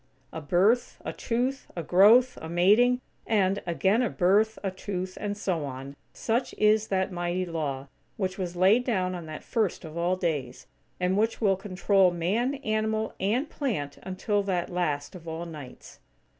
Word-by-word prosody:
A 160 - -5
birth, 195 +10 +2
a - - -3
tooth, 255 +3 -2
a 170 - -3
growth, 220 +9 +6
a 160 - -6
mating; 215 +9 +4 0.3
and, 200 -3 +2
again 190 +6 +2
a 245 - +1
birth, 205 +4 +2
a 195 - -1
tooth, 185 -1 -5
and 205 0 -3
so 180 -6 -1
on. 135 0 -7 0.2
Such 235 +3 -2
is 215 0 +3
that 190 0 0
mighty 175 +1 -2
Law, 145 -5 -3 0.3
which 185 -2 -2
was 180 -2 -3
laid 195 +7 +4
down 185 -7 0
on 175 -3 -6
that 155 0 -7
first 215 -7 -1
of 155 0 -9
all 175 +2 +1
days; 150 -9 -3 0.3
and 180 +1 +1
which 225 +1 0
will 200 -4 +3
control 195 0 +2
Man, 200 +11 0
animal, 220 0 0
and 230 +10 0
plant 200 - -3
until 190 +2 -1
that 185 -3 -2
last 150 -5 -2
of 170 -3 -11
all 165 +1 -4
nights. 150 -6 -11
185 Hz, 170 wpm, -27 LUFS, 170-215 Hz, 0.3 s, growth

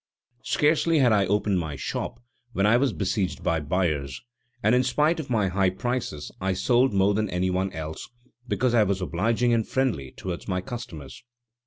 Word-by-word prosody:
Scarcely 155 +2 +2
had 130 -5 +4
I 100 -2 +3
opened 100 -1 +1
my 80 -4 -4
shop 70 - -4 0.3
when 100 - +1
I 105 +3 +5
was 130 +1 +2
besieged 100 -2 -2
by 85 -2 +1
buyers, 75 -4 -1 0.4
and 105 - +4
in 125 - +5
spite 150 +6 +1
of 150 - -6
my 110 -5 +2
high 95 +1 +2
prices 95 - -3
I 95 0 0
sold 125 +7 +2
more 100 0 +3
than 105 0 0
any 90 +1 0
one 95 +1 -1
else, 80 -1 -6 0.4
because 120 +3 +1
I 115 - +5
was 100 -2 +1
obliging 115 +7 +1
and 115 -2 +1
friendly 120 - -1
towards 90 -2 -6
my 90 -2 0
customers. 90 - -8
100 Hz, 180 wpm, -25 LUFS, 90-120 Hz, 0.4 s, I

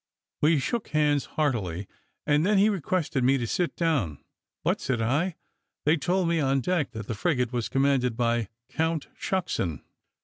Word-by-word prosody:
We 155 +1 +5
shook 215 - -2
hands 150 -2 +2
heartily, 105 - 0 0.4
and 150 +1 +3
then 205 +3 +3
he 205 +2 +5
requested 170 -7 0
me 135 +2 +4
to 120 - -2
sit 175 +9 -1
down. 140 - 0 0.5
"But," - - +1
said 125 -3 -1
I, 145 +10 +1 0.5
"they 150 +2 +5
told 180 +3 +1
me 170 -1 +2
on 135 -2 +2
deck 170 0 0
that 110 -2 -5
the 115 - -3
frigate 125 -1 0
was 120 -3 -1
commanded 135 -4 +2
by 120 -1 +2
a 115 -3 -2 0.2
Count 160 +1 -1
Shucksen." 165 - -2
145 Hz, 170 wpm, -27 LUFS, 120-165 Hz, 0.5 s, We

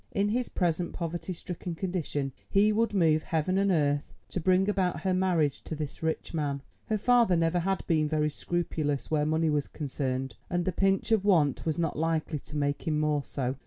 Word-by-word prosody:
In 200 +1 +1
his 245 +3 0
present 175 -1 0
poverty 170 0 -4
stricken 175 0 -5
condition 165 -6 -2 0.2
he 205 +2 +4
would 225 +1 +2
move 160 -6 +3
heaven 165 +5 0
and 200 0 +2
earth 145 -5 +1
to - - -3
bring 185 +3 +3
about 185 -6 0
her 185 +2 +1
marriage 175 -6 +1
to 160 - -4
this 150 -2 -5
rich 160 +1 -2
man. 145 -3 -2 0.2
Her 215 - +1
father 235 -3 +4
never 165 +1 +2
had 190 +2 -1
been 155 -3 +2
very 150 0 +1
scrupulous 155 -4 -2
where 150 -1 +2
money 160 0 +2
was 145 -1 0
concerned, 135 -3 -3
and 175 -1 0
the 185 - +1
pinch 195 +4 +1
of 220 -3 +4
want 165 -9 +2
was 155 - 0
not 165 -3 -1
likely 160 -1 0
to 150 +2 -8
make 145 +1 -1
him 155 -1 +1
more 150 -1 +1
so. 130 -1 -3
165 Hz, 200 wpm, -29 LUFS, 150-185 Hz, 0.2 s, he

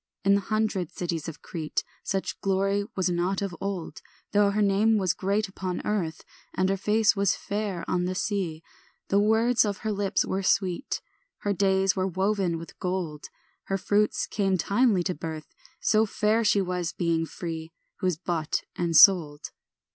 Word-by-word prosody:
In 200 - +4
the 200 - +3
hundred 215 -5 -1
cities 170 -3 -3
of 165 - -8
Crete 160 -3 -3 0.2
Such 195 -1 -3
glory 195 +1 +1
was 185 -1 +1
not 180 +2 0
of 190 -3 -4
old, 195 -4 -4 0.3
Though 205 -1 +4
her 210 +1 0
name 205 +3 +3
was 190 -4 +1
great 200 +2 0
upon 185 -2 -5
earth 175 -7 -2 0.3
And 185 0 +1
her 195 - +2
face 210 +3 +2
was 200 -1 +2
fair 200 -3 -3
on 180 -1 0
the 185 +1 -2
sea. 180 -6 -2 0.5
The 200 - +3
words 225 +3 +3
of 205 -3 -3
her 215 - +1
lips 200 -1 0
were 190 - -2
sweet, 190 +4 0 0.4
Her 205 - 0
days 190 -1 +2
were 190 -1 0
woven 190 -2 0
with 165 0 -11
gold, 180 -5 -3 0.4
Her 195 - -1
fruits 205 +2 +1
came 195 -3 0
timely 200 0 +2
to 180 - -1
birth; 160 -1 -7 0.3
So 215 0 +3
fair 215 +3 +1
she 205 -2 +3
was, 180 -2 -2
being 165 -1 0
free, 165 -2 -6 0.3
Who 185 - 0
is 180 -4 0
bought 165 -3 -2
and 170 -2 +1
sold. 160 -7 +6
190 Hz, 170 wpm, -27 LUFS, 175-205 Hz, 0.5 s, sold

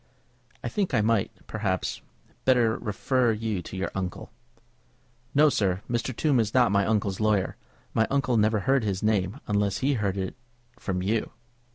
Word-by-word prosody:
"I - - -2
think 195 -9 -1
I 110 - +4
might, 110 -1 +2 0.2
perhaps, 100 -4 -2 0.4
better 120 -4 +4
refer 120 +3 +1
you 110 -3 -2
to 95 - -8
your 95 - -2
uncle." 95 +1 -4 1.0
"No, 150 +2 +7
sir; 100 -8 +1
Mr. 120 +2 -1
Tombe 140 -2 +2
is 110 +1 0
not 125 -4 +5
my 100 -1 +2
uncle's 105 -3 0
lawyer. 105 -3 +1 0.4
My 110 0 +2
uncle 135 -3 +1
never 110 -1 +3
heard 135 +2 +2
his 100 -2 -2
name, 105 +2 +1
unless 100 -1 +1
he 140 - +3
heard 100 -5 -1
of 95 - 0
it - - -19 0.4
from 90 -4 -2
you." 105 +3 0
110 Hz, 170 wpm, -27 LUFS, 100-120 Hz, 1.0 s, No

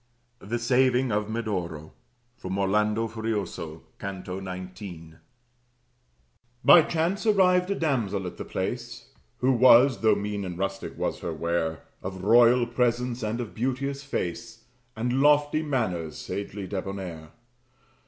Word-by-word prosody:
THE 115 +3 -3
SAVING 125 +1 +2
OF 105 0 -1
MEDORO 90 -9 -4 0.4
From 95 -4 -5
'Orlando 105 +3 +1
Furioso,' 105 -8 -4 0.2
Canto 95 -1 -5
19 90 -3 -8 1.5
By 175 - +9
chance 170 +7 -1
arrived 180 -3 +4
a 200 - +1
damsel 115 - -1
at 90 - -6
the - - -5
place, - - -5 0.3
Who 130 +1 +4
was 125 +1 +6
(though 110 -2 +4
mean 100 0 -3
and 90 -2 -5
rustic 95 +1 -4
was - - -2
her 85 - -4
wear) 80 0 -2 0.2
Of 95 0 -6
royal 120 +3 +6
presence 120 0 0
and 110 +2 -2
of 120 -4 -5
beauteous 135 +3 -2
face, 115 - -4 0.3
And 120 +4 0
lofty 145 +1 +4
manners, 105 - -2
sagely 100 0 -5
debonnair. 95 -4 -5
110 Hz, 125 wpm, -26 LUFS, 95-125 Hz, 1.5 s, By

